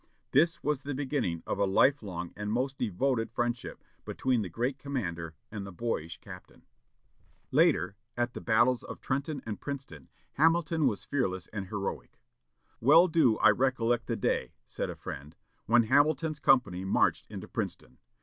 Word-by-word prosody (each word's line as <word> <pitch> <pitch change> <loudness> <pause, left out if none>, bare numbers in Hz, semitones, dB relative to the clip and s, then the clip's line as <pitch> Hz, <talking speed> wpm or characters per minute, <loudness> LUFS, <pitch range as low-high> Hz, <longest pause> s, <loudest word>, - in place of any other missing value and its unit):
This 165 +5 +3
was 145 -2 0
the 140 0 -4
beginning 130 - -2
of - - -3
a 100 - +4
life 130 +9 +4
long 90 -4 -6
and 105 0 -4
most 130 +4 -1
devoted 120 +2 0
friendship 120 +1 -3 0.2
between 130 -3 0
the 95 - -4
great 125 - -2
commander 85 - -4 0.2
and 105 -2 -5
the 100 - -8
boyish 85 -5 -3
captain. 90 -2 -13 0.9
Later, 90 +4 +3 0.2
at 120 0 0
the - - -7
battles 120 +2 +3
of - - -9
Trenton 140 +1 -3
and 110 -2 -5
Princeton, 130 - -7 0.2
Hamilton 160 0 +3
was 100 -6 -2
fearless 95 -10 -1
and 100 -3 -4
heroic. 100 -1 -5 0.6
"Well 160 +9 +7
do 155 -10 +3
I 110 - +6
recollect 120 -1 +1
the - - -1
day," - - -1
said - - -4
a - - -5
friend, 75 +3 -8 0.3
"when 120 +1 +5
Hamilton's 150 +5 +2
company 125 -12 +3
marched 95 - +1
into - - -7
Princeton. 65 - -5
120 Hz, 160 wpm, -30 LUFS, 100-140 Hz, 0.9 s, Well